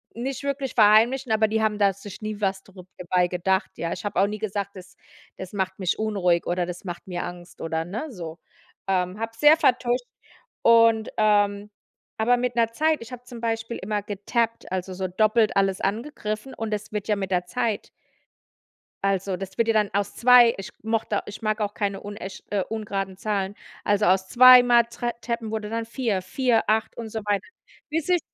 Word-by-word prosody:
nicht 255 Hz, +2 st, -4 dB
wirklich 275 Hz, -2 st, -2 dB
verheimlichen, 225 Hz, +4 st, +4 dB
aber 220 Hz, 0 st, +3 dB
die 220 Hz, +1 st, 0 dB
haben 215 Hz, -1 st, +1 dB
da 200 Hz, -2 st, +3 dB
sich 200 Hz, +2 st, -11 dB
nie 215 Hz, -1 st, -5 dB
was 195 Hz, -1 st, -1 dB
darüber 185 Hz, -2 st, -14 dB
dabei 180 Hz, 0 st, +1 dB
gedacht, 190 Hz, +2 st, 0 dB
ja. 170 Hz, -, -3 dB
Ich 180 Hz, -, -7 dB
habe 205 Hz, -3 st, -1 dB
auch 195 Hz, -, +5 dB
nie 210 Hz, 0 st, -5 dB
gesagt, 200 Hz, -2 st, -3 dB
das 180 Hz, -1 st, -12 dB, 0.4 s
das 190 Hz, +1 st, -8 dB
macht 190 Hz, -1 st, -2 dB
mich 185 Hz, 0 st, -1 dB
unruhig 190 Hz, -6 st, +1 dB
oder 175 Hz, 0 st, 0 dB
das 175 Hz, 0 st, -7 dB
macht 175 Hz, -1 st, -6 dB
mir 175 Hz, -1 st, -3 dB
Angst 175 Hz, 0 st, -9 dB
oder, 160 Hz, 0 st, -2 dB
ne, 225 Hz, -, -5 dB
so. 170 Hz, -5 st, -8 dB, 0.5 s
Ähm, 185 Hz, +1 st, 0 dB
habe 225 Hz, 0 st, -2 dB
es 230 Hz, -, -21 dB
sehr 300 Hz, +2 st, +7 dB
vertuscht 250 Hz, -2 st, +1 dB, 0.6 s
und 230 Hz, -1 st, +5 dB
ähm, 205 Hz, -1 st, +2 dB, 0.5 s
aber 245 Hz, +3 st, +3 dB
mit 245 Hz, -1 st, -2 dB
'ner 230 Hz, -1 st, +2 dB
Zeit 310 Hz, 0 st, +1 dB
ich 230 Hz, -, -10 dB
habe 245 Hz, -1 st, -8 dB
zum 240 Hz, -2 st, -10 dB
Beispiel 225 Hz, 0 st, -2 dB
immer 205 Hz, +1 st, -2 dB
getappt, 220 Hz, +2 st, -2 dB
also 185 Hz, 0 st, -3 dB
so 185 Hz, 0 st, -2 dB
doppelt 215 Hz, +3 st, +2 dB
alles 195 Hz, -1 st, +2 dB
angegriffen 215 Hz, +2 st, -3 dB
und 220 Hz, -1 st, -3 dB
es 210 Hz, 0 st, -4 dB
wird 210 Hz, -1 st, -4 dB
ja 210 Hz, -, +2 dB
mit 195 Hz, -1 st, -3 dB
der 180 Hz, -1 st, +1 dB
Zeit 225 Hz, +2 st, -2 dB, 1.1 s
also 195 Hz, -1 st, 0 dB
das 190 Hz, -1 st, -8 dB
wird 230 Hz, -, +2 dB
ja 225 Hz, -, +3 dB
dann 210 Hz, -2 st, +2 dB
aus 200 Hz, 0 st, -1 dB
2 240 Hz, -1 st, +7 dB
ich 195 Hz, -, -7 dB
mochte 220 Hz, -2 st, -1 dB
ich 205 Hz, -, -9 dB
mag 215 Hz, 0 st, -1 dB
auch 205 Hz, 0 st, -1 dB
keine 200 Hz, -3 st, -2 dB
unechte 200 Hz, -2 st, -8 dB
äh, 200 Hz, -2 st, +1 dB
ungeraden 195 Hz, -4 st, -4 dB
Zahlen, 200 Hz, -1 st, -2 dB, 0.3 s
also 205 Hz, 0 st, +2 dB
aus 190 Hz, 0 st, +3 dB
zweimal 245 Hz, -1 st, +8 dB
Trap 235 Hz, 0 st, -4 dB
Tappen 235 Hz, -2 st, -3 dB
wurde 215 Hz, -1 st, -3 dB
dann 230 Hz, 0 st, -3 dB
4, 230 Hz, -5 st, -1 dB
4, 230 Hz, +4 st, +1 dB
8 220 Hz, 0 st, 0 dB
und 225 Hz, -2 st, -6 dB
so 220 Hz, -, -4 dB
weiter, 205 Hz, -1 st, 0 dB, 0.4 s
bis 320 Hz, +2 st, -2 dB
es 360 Hz, -, +4 dB
210 Hz, 195 wpm, -24 LUFS, 190-230 Hz, 1.1 s, zweimal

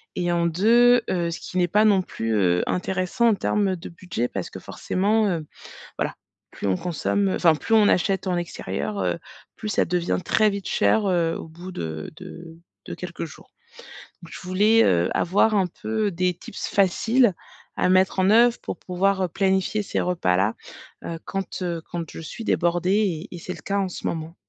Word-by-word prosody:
et 175 Hz, -1 st, 0 dB
en 170 Hz, 0 st, +1 dB
2, 235 Hz, +8 st, +5 dB
heu, 170 Hz, -2 st, 0 dB
ce 165 Hz, -, -5 dB
qui 185 Hz, -, -6 dB
n'est 180 Hz, -1 st, +3 dB
pas 210 Hz, +5 st, +3 dB
non 200 Hz, -3 st, +4 dB
plus, 115 Hz, -9 st, -3 dB
heu, 90 Hz, -4 st, +2 dB
intéressant 185 Hz, +6 st, 0 dB
en -, -, +4 dB
termes 195 Hz, -1 st, 0 dB
de 165 Hz, -, -9 dB
budget 170 Hz, -8 st, -3 dB
parce 95 Hz, -6 st, -5 dB
que -, -, -8 dB
forcément, 210 Hz, +3 st, 0 dB
heu, 165 Hz, -5 st, -2 dB, 0.5 s
voilà, -, -, -1 dB, 0.4 s
plus -, -, -6 dB
on 95 Hz, -2 st, +2 dB
consomme 195 Hz, +3 st, 0 dB
enfin 165 Hz, -3 st, +4 dB
plus 225 Hz, +8 st, -1 dB
on 215 Hz, -2 st, +6 dB
achète 190 Hz, +2 st, +1 dB
en 180 Hz, -1 st, 0 dB
extérieur, 185 Hz, +4 st, -4 dB
heu, -, -, -1 dB, 0.4 s
plus 215 Hz, -, -5 dB
ça -, -, +2 dB
devient 175 Hz, 0 st, 0 dB
très 215 Hz, -1 st, +3 dB
vite 200 Hz, -2 st, -4 dB
cher, 155 Hz, -, +2 dB
heu, 170 Hz, -3 st, +1 dB
au -, -, -8 dB
bout 175 Hz, +3 st, -10 dB
de 80 Hz, -, -5 dB
de 170 Hz, -2 st, -10 dB, 0.3 s
de -, -, -5 dB
quelques 180 Hz, -2 st, -6 dB
jours, 155 Hz, -, -15 dB, 0.7 s
donc 170 Hz, -, -12 dB
je -, -, -8 dB
voulais, 205 Hz, +5 st, +3 dB
heu, 85 Hz, 0 st, +3 dB
avoir 200 Hz, +5 st, +2 dB
un 190 Hz, -3 st, +2 dB
peu, 215 Hz, +4 st, -2 dB
des 180 Hz, 0 st, 0 dB
tips 175 Hz, -, -7 dB
faciles 220 Hz, +4 st, +3 dB, 0.4 s
à -, -, +1 dB
mettre 185 Hz, +1 st, +3 dB
en 185 Hz, +1 st, +3 dB
oeuvre 235 Hz, +2 st, +5 dB
pour -, -, -6 dB
pouvoir, 190 Hz, +2 st, 0 dB
heu, -, -, +1 dB
planifier 190 Hz, +4 st, 0 dB
ces -, -, -2 dB
repas-là. 105 Hz, -, +1 dB, 0.5 s
Heu, 165 Hz, -1 st, -5 dB
quand, 195 Hz, 0 st, -4 dB
heu, 170 Hz, -2 st, -2 dB
quand 170 Hz, -3 st, -4 dB
je -, -, -9 dB
suis 195 Hz, +8 st, -7 dB
débordé 180 Hz, 0 st, +1 dB
et -, -, -7 dB
et -, -, -8 dB
c'est 180 Hz, -, -6 dB
le -, -, -12 dB
cas 200 Hz, -, -2 dB
en 190 Hz, -, -1 dB
ce -, -, -5 dB
moment. 165 Hz, 0 st, -4 dB
180 Hz, 195 wpm, -24 LUFS, 170-200 Hz, 0.7 s, on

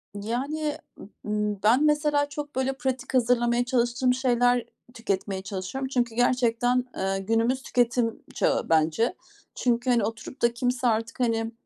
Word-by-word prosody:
Yani, 275 Hz, +9 st, -2 dB, 0.5 s
ııı, 210 Hz, -1 st, -1 dB
ben 240 Hz, +7 st, +4 dB
mesela 295 Hz, -1 st, +2 dB
çok 290 Hz, 0 st, -6 dB
böyle 265 Hz, +1 st, 0 dB
pratik 265 Hz, -1 st, -3 dB
hazırlamaya 240 Hz, -1 st, +2 dB
çalıştığım 245 Hz, 0 st, +1 dB
şeyler 245 Hz, -1 st, +2 dB, 0.3 s
tüketmeye 195 Hz, -4 st, -3 dB
çalışıyorum 195 Hz, +8 st, -4 dB
çünkü 240 Hz, -3 st, -1 dB
gerçekten, 245 Hz, 0 st, +2 dB
eee, 195 Hz, 0 st, -1 dB
günümüz 225 Hz, +6 st, +1 dB
tüketim 240 Hz, -1 st, 0 dB
çağı -, -, 0 dB
bence. 165 Hz, -, +2 dB, 0.4 s
Çünkü, 245 Hz, 0 st, 0 dB
hani, 240 Hz, -3 st, +3 dB
oturup 225 Hz, +4 st, -6 dB
da 235 Hz, 0 st, +3 dB
kimse 245 Hz, 0 st, 0 dB
artık, 225 Hz, +2 st, -1 dB
hani, 225 Hz, -2 st, 0 dB
240 Hz, 135 wpm, -26 LUFS, 225-255 Hz, 0.5 s, ben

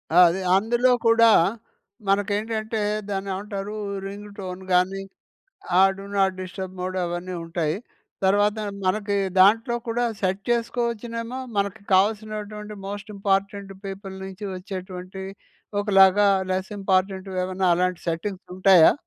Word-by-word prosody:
ఆ! -, -, +5 dB
అది 185 Hz, +3 st, -2 dB, 0.2 s
అందులో 240 Hz, +5 st, +2 dB
కూడా, 230 Hz, 0 st, +6 dB, 0.8 s
మనకేంటంటే, 215 Hz, +2 st, 0 dB, 0.3 s
దాన్నేవంటారూ? 200 Hz, +1 st, -4 dB, 0.3 s
రింగు 205 Hz, +1 st, -7 dB
టోన్ 185 Hz, -2 st, -6 dB
గానీ, 185 Hz, +2 st, +2 dB, 0.8 s
ఆ! -, -, +7 dB, 0.2 s
డు 195 Hz, -, -8 dB
నాట్ 195 Hz, -1 st, +3 dB
డిస్టర్బ్ 185 Hz, 0 st, -6 dB
మోడ్ 185 Hz, +1 st, -3 dB
అవన్నీ 175 Hz, +1 st, -4 dB
ఉంటాయి. 165 Hz, -1 st, -1 dB, 0.5 s
తర్వాత 205 Hz, +2 st, +3 dB, 0.3 s
మనకి 200 Hz, +2 st, 0 dB, 0.2 s
దాంట్లో 225 Hz, +5 st, +5 dB
కూడా, 240 Hz, +1 st, 0 dB, 0.2 s
సెట్ 190 Hz, +1 st, 0 dB
చేసుకోవచ్చునేమో. 235 Hz, 0 st, -2 dB, 0.2 s
మనకి 200 Hz, +1 st, -1 dB
కావాల్సినటువంటి 210 Hz, +1 st, -1 dB
మోస్ట్ 205 Hz, +1 st, -6 dB
ఇంపార్టెంట్ 195 Hz, 0 st, -1 dB
పీపుల్ 195 Hz, 0 st, -7 dB
నుంచి 190 Hz, +2 st, -8 dB
వచ్చేటువంటియి 185 Hz, 0 st, -7 dB, 0.5 s
ఒకలాగా, 200 Hz, 0 st, +5 dB, 0.2 s
లెస్ 185 Hz, 0 st, -2 dB
ఇంపార్టెంట్‌వేమన్నా, 190 Hz, -1 st, 0 dB
అలాంటి 180 Hz, 0 st, 0 dB
సెట్టింగ్స్ 180 Hz, +4 st, -3 dB
ఉంటాయా? 185 Hz, -3 st, +7 dB
195 Hz, 110 wpm, -24 LUFS, 185-210 Hz, 0.8 s, ఆ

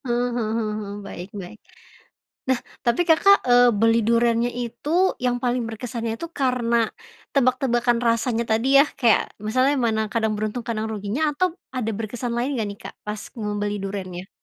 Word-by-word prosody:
Eh, -, -, -5 dB, 0.3 s
heeh 225 Hz, -3 st, -1 dB
heeh 215 Hz, -2 st, -1 dB
heeh, 200 Hz, -1 st, -6 dB
baik 180 Hz, 0 st, -8 dB
baik. 185 Hz, +4 st, -11 dB, 0.9 s
Nah 260 Hz, -2 st, +3 dB, 0.2 s
tapi 235 Hz, +4 st, +1 dB
Kakak, 365 Hz, +5 st, +6 dB
eee, 245 Hz, 0 st, +6 dB
beli 225 Hz, +1 st, +4 dB
durennya 235 Hz, +1 st, +2 dB
itu 240 Hz, +3 st, -5 dB, 0.3 s
yang 245 Hz, -1 st, +2 dB
paling 245 Hz, 0 st, +1 dB
berkesannya 230 Hz, 0 st, -4 dB
itu 335 Hz, -, -4 dB
karena 250 Hz, -4 st, +1 dB, 0.5 s
tebak-tebakan 245 Hz, -2 st, +2 dB
rasanya 230 Hz, 0 st, +1 dB
tadi 225 Hz, +4 st, +2 dB
ya, 280 Hz, -, +8 dB
kayak 235 Hz, -4 st, +4 dB, 0.2 s
misalnya 255 Hz, +6 st, +3 dB
mana 220 Hz, -1 st, +1 dB
kadang 220 Hz, -2 st, +1 dB
beruntung, 215 Hz, +3 st, -3 dB
kadang 220 Hz, -2 st, -2 dB
ruginya 210 Hz, +6 st, -3 dB
atau 355 Hz, +6 st, +1 dB, 0.3 s
ada 225 Hz, -3 st, -1 dB
berkesan 235 Hz, +2 st, -4 dB
lain 240 Hz, +3 st, -1 dB
nggak 220 Hz, -, -1 dB
nih, 200 Hz, -, -9 dB
Kak, -, -, -8 dB
pas 210 Hz, 0 st, -4 dB, 0.2 s
membeli 205 Hz, -1 st, -2 dB
durennya? 190 Hz, -2 st, -5 dB
230 Hz, 160 wpm, -23 LUFS, 215-245 Hz, 0.9 s, ya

